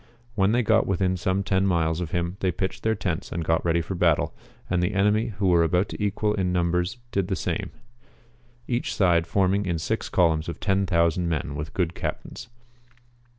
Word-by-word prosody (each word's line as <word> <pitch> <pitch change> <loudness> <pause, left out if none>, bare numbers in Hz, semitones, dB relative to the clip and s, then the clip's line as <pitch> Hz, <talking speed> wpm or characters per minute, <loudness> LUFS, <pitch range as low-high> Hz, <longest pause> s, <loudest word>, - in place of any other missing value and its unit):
When 100 -2 +2
they 120 +2 +2
got - - +3
within 95 -1 +1
some 95 +2 0
10 95 0 +1
miles 85 -2 +1
of 85 - -3
him 85 +1 -2
they 95 - +1
j)itchcd 95 +3 -3
their 110 0 +1
tents 90 -6 -3
and 85 -1 -3
got 80 +1 +1
ready 85 0 +2
for 90 - -5
battle, 85 -4 +2 0.3
and 90 -1 0
the 90 +3 0
enemy 105 +3 +2
who 100 - -1
were 85 -1 +5
about 90 +4 +1
equal 105 +1 0
in 95 -3 0
numbers 90 +4 0
did 100 -2 0
the 95 - -1
same; - - -3 1.0
each 120 -1 -1
side 85 -4 +3
forming 100 +1 +1
in 85 -2 0
six 110 +8 -2
columns 80 -3 +2
of 85 - -6
10,000 90 -3 +1
men 75 -3 -2
with 75 +2 -6
good 90 -2 0
cajitains. 120 - -6
90 Hz, 190 wpm, -25 LUFS, 85-100 Hz, 1.0 s, were